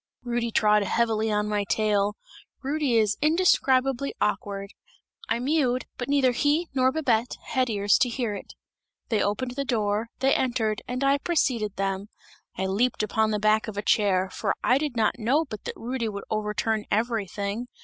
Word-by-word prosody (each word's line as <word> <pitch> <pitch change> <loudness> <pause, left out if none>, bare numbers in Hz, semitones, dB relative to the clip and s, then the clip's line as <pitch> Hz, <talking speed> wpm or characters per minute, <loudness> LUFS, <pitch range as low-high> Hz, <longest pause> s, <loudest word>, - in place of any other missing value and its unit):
Rudy 240 -1 -1
trod 210 -1 +3
heavily 220 +1 +1
on 210 0 0
my 210 -1 0
tail! 205 0 +1 0.5
Rudy 280 -2 0
is 215 -1 +2
indescribably 275 -5 +2
awkward; 200 -1 -2 0.6
I 225 - +2
mewed, 255 -1 +1
but 245 - -3
neither 275 -3 +3
he 295 +7 +1
nor 260 -1 +3
Babette 250 -6 0
had 255 -1 +1
ears 205 -2 +2
to 250 - +3
hear 235 -3 -2
it. 200 - -9 0.5
They 220 -3 +1
opened 245 +5 -1
the 275 +3 -3
door, 220 -3 -1
they 270 +1 +2
entered 225 -4 0
and 250 +2 -3
I 275 +1 +3
preceded 250 - 0
them; 195 +1 -2 0.5
I 190 - -1
leaped 215 +5 +1
upon 220 +1 +1
the 210 - 0
back 215 +1 +2
of 210 -2 -6
a 205 - -2
chair, 190 -3 +2
for - - -1
I 255 +2 +4
did 290 -5 -3
not 220 -1 +1
know 270 +9 +2
but 215 -7 -9
that - - -5
Rudy 235 -1 -3
would 200 -1 -6
overturn 215 0 -1
everything! 215 0 -2
225 Hz, 170 wpm, -26 LUFS, 210-260 Hz, 0.6 s, I